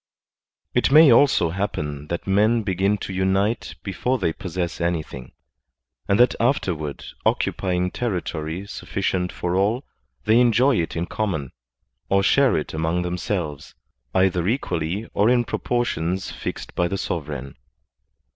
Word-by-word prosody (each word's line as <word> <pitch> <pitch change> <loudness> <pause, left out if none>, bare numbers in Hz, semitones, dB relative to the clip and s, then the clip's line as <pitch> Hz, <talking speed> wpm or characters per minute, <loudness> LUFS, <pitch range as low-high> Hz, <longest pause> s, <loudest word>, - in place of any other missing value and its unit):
It 125 - +2
may 150 -1 +8
also 115 - +4
happen 75 -6 -3
that 85 - -4
men 110 +4 +3
begin 100 +1 +1
to 95 - -6
tmite 95 +4 0
before 115 +7 -1
they 80 -9 0
possess 85 -1 -4
anything, 80 -7 -3 0.8
and 100 +2 +2
that 125 - +6
afterward 90 - -1 0.2
occupying 90 -1 0
ter 120 - -2
ritory 80 +2 -5
suflficient 90 -2 -2
for 90 0 -2
all, 105 +8 +1 0.4
they 110 +2 +4
enjoy 125 +2 +4
it 80 - -4
in 85 +1 -1
common, 90 -11 -3 0.6
or 100 0 +3
share 140 +4 +4
it 75 - -4
among 80 +3 0
themselves, 85 -4 -3 0.4
either 90 -2 +2
equally 95 - -1
or 105 +3 +3
in 120 -1 +4
proportions 95 -9 -1
fixed - - -6
by 90 - +1
the 100 - -2
sovereign. 70 -7 -4
95 Hz, 135 wpm, -23 LUFS, 85-110 Hz, 0.8 s, may